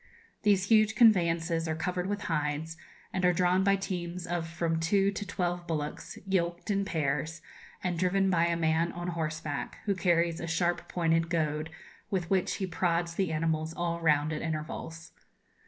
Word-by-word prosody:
These 200 -2 +2
huge 220 -1 +5
conveyances 170 -7 +4
are 160 - -1
covered 180 +2 -2
with 205 0 -2
hides, 150 0 -2 0.4
and 185 - -1
are 180 - +5
drawn 180 +2 +3
by 200 0 +4
teams 180 -2 -4
of 175 -1 -2
from 165 0 -1
two 195 +4 +2
to 205 0 -5
twelve 175 -2 -2
bullocks, 150 -2 -4
yoked 175 0 -1
in 200 0 +1
pairs, 155 -1 -2 0.4
and 175 -2 -1
driven 195 +2 +2
by 170 -1 +3
a 170 0 0
man 165 +1 +1
on 175 0 -4
horseback, 155 -3 -3
who 200 - +2
carries 170 -3 +1
a 165 - -4
sharp 170 +1 0
pointed 165 -1 +1
goad, 155 -2 -1 0.4
with 180 -3 -2
which 190 -2 +2
he 195 - -2
prods 170 -1 0
the 185 -1 0
animals 160 0 -1
all 170 -1 -2
round, 150 -1 +3
at 150 - -3
intervals. 160 +1 -5
170 Hz, 170 wpm, -30 LUFS, 160-185 Hz, 0.4 s, huge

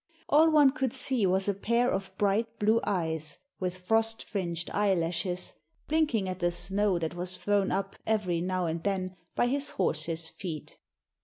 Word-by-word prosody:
All 315 +3 +6
one 295 -3 +6
could 265 -4 -2
see 255 -8 +1
was 190 +2 +1
a 200 - +2
pair 235 +5 +1
of 190 -1 -2
bright 220 +3 +1
blue 220 +2 +3
eyes 160 -5 -1 0.2
with 185 -1 -2
frost 225 +4 +1
fringed 170 -5 -4
eyelashes, 180 -2 0 0.3
blinking 295 -11 +1
at 185 0 -4
the 175 -1 +2
snow 190 +2 +2
that 165 -1 -2
was 180 +1 -2
thrown 205 -1 +1
up 195 0 -2
every 190 -6 +1
now 185 0 -1
and 165 0 -2
then 190 -2 -1 0.2
by - - +3
his 275 +3 +1
horse's 165 - -1
feet. 165 -2 -7
195 Hz, 165 wpm, -29 LUFS, 175-225 Hz, 0.3 s, All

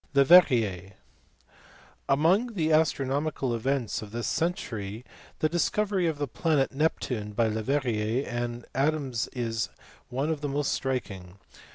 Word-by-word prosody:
Leverriert. 120 - +5 1.2
Among 185 - +3
the 160 -3 +1
astronomical 145 -3 +1
events 120 0 -1
of 110 - -8
this 115 +2 -4
century 115 - -2 0.4
the 155 - +4
discovery 190 +2 0
of 160 -2 -1
the 145 0 -2
planet 150 0 +1
Neptune 125 -7 -1
by 115 +2 +2
Leverrier 115 +1 0
and 120 0 -4
Adams 135 -4 0
is 115 -3 -2 0.4
one 135 +5 -1
of 155 -2 -3
the 145 - -2
most 140 0 0
striking. 100 -9 -4
135 Hz, 125 wpm, -27 LUFS, 115-155 Hz, 1.2 s, Leverriert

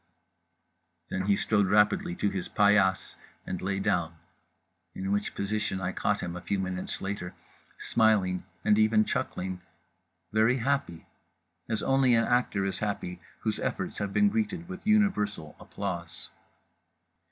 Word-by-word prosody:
_" - - -30
Then 95 +1 -2
he 100 - +4
strode 100 -1 +2
rapidly 105 -3 +3
to 100 - 0
his 95 -2 -4
paillasse 100 -3 +3 0.3
and 90 - -4
lay 95 +1 -1
down; 85 -3 0 0.8
in 95 +1 -3
which 105 0 -1
position 100 -1 -1
I 90 -1 -2
caught - - 0
him, 85 0 -4
a 90 - -6
few 90 +3 -1
minutes 95 -1 -3
later, 95 -2 -4 0.4
smiling 105 -5 +2 0.2
and 105 0 +4
even 110 0 +4
chuckling… 90 0 -3 0.7
very 110 +4 +4
happy… 125 -10 -1 0.6
as 110 - -1
only 135 -2 +4
an 115 - +3
actor 120 -5 +1
is 95 - -2
happy 90 -4 -3 0.2
whose - - -1
efforts - - -3
have 100 -1 -2
been 205 - +4
greeted 200 -6 -2
with 185 +2 -8
universal 105 - +1
applause…. 85 -4 -6
100 Hz, 140 wpm, -28 LUFS, 95-110 Hz, 0.8 s, he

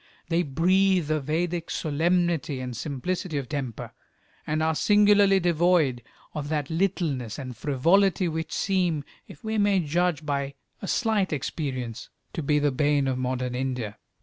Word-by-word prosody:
They 170 +1 +2
breathe 180 +2 +2
a 155 - +2
Vedic 165 +4 -2
solemnity 165 -2 0
and 125 -1 -5
simplicity 155 - -3
of 135 -3 -3
temper, 135 -6 -5 0.5
and 155 +1 0
are 160 0 +2
singularly 205 +1 +5
devoid 170 -7 +2 0.3
of 145 -2 -4
that 150 -1 -2
littleness 160 - -1
and 130 -3 -6
frivolity 175 - +2
which 160 0 -3
seem, 180 -6 0 0.2
if 145 - -14
we 220 0 -1
may 205 -2 +3
judge 170 -1 0
by 140 -1 -2 0.3
a 195 - -5
slight 220 -4 +1
experience, 130 -5 -4 0.2
to - - -3
be 150 0 +2
the 145 -1 +2
bane 145 0 +2
of 130 -1 -1
modern 125 -1 -2
India. 125 -5 -3
155 Hz, 150 wpm, -26 LUFS, 135-180 Hz, 0.5 s, singularly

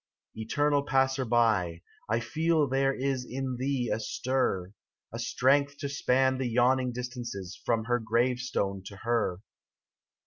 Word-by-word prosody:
Eternal 145 +6 +1
Passer 135 -2 +1
by, 110 -8 +2 0.3
I 110 +2 +2
feel 160 +5 +1
there 135 +1 +2
is 135 -1 -1
In 130 0 -4
thee 130 -1 -1
a 110 - -2
stir, 110 -6 -1 0.4
A 115 - -5
strength 140 +4 +2
to 140 - -3
span 130 -1 +2
the 130 -2 -1
yawning 125 +2 +2
distances 120 -6 -6
From 115 -2 +1
her 120 +1 +1
grave 120 +2 +1
stone 100 -6 -2
to 100 - -9
her. 115 -6 0
125 Hz, 140 wpm, -29 LUFS, 115-135 Hz, 0.4 s, by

